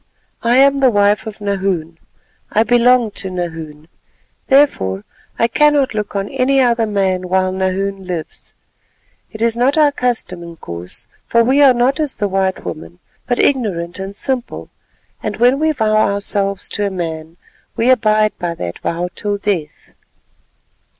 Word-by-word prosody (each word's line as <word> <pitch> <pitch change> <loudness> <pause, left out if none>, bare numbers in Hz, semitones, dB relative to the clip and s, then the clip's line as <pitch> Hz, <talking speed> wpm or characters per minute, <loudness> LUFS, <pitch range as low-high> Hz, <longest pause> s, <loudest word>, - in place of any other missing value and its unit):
I 240 +2 +2
am 275 +1 +5
the 265 -2 +5
wife 205 0 +2
of 215 -1 -8
Nahoon—I 195 +1 -3
belong 245 -1 +3
to 195 - -6
Nahoon; 160 -4 -6 0.6
therefore, 105 - +2 0.3
I 230 - +3
cannot 295 0 +2
look 210 -1 -4
on 200 0 -1
any 270 +2 +1
other 235 -3 +2
man 190 -3 -1
while 185 0 +1
Nahoon 190 +1 -2
lives. 170 -4 -6 0.8
It 220 +1 -4
is 230 -1 +2
not 255 +5 +2
our 300 -2 +5
custom, 240 -9 -2
Inkoos, 115 - -9 0.2
for 235 0 +3
we 265 +5 +3
are 270 -3 +6
not 255 +5 +1
as 300 -4 -2
the 205 - -1
white 190 -1 -1
women, 85 -1 -7 0.3
but 245 - 0
ignorant 195 -10 0
and 195 +1 -6
simple, 255 +2 -3 0.5
and - - -4
when 250 +3 +3
we 315 0 +2
vow 220 -7 0
ourselves 200 -1 0
to 205 -1 -1
a - - -2
man, 165 -3 -5 0.4
we 240 +3 +3
abide 215 -3 +2
by 170 -1 -3
that 85 - -6
vow 175 +1 -2
till 205 -1 -2
death." 185 -7 -4
205 Hz, 150 wpm, -17 LUFS, 180-245 Hz, 0.8 s, are